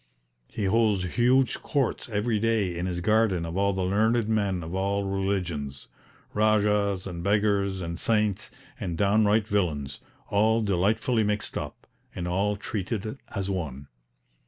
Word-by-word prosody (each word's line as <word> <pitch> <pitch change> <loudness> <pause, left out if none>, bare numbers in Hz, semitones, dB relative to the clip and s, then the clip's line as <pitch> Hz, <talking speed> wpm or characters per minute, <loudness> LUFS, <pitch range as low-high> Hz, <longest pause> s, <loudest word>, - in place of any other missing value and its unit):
He 105 - -3
holds 105 -1 +2
huge 125 +2 +3
courts 140 -5 -1
every 105 +1 0
day 110 -5 +1
in 85 +2 -2
his 90 -1 -3
garden 105 -3 +2
of 85 +1 -5
all 100 +1 +2
the 95 -1 -2
learned 110 +4 +2
men 100 -5 0
of 80 +2 -7
all 100 +1 0
religions 95 -8 -2 0.4
Rajahs 105 -2 +2
and 85 -3 -5
beggars 100 -1 +1
and 85 -1 -4
saints 105 -3 0 0.3
and 85 -3 -3
downright 105 +2 +3
villains 75 -10 -1 0.3
all 110 +2 +2
delightfully 110 +5 +1
mixed 105 0 -2
up, - - -6 0.3
and 90 -1 -3
all 100 +4 +1
treated 110 +4 -4
as 100 -2 -3
one. 70 -7 -4
100 Hz, 140 wpm, -27 LUFS, 90-110 Hz, 0.4 s, huge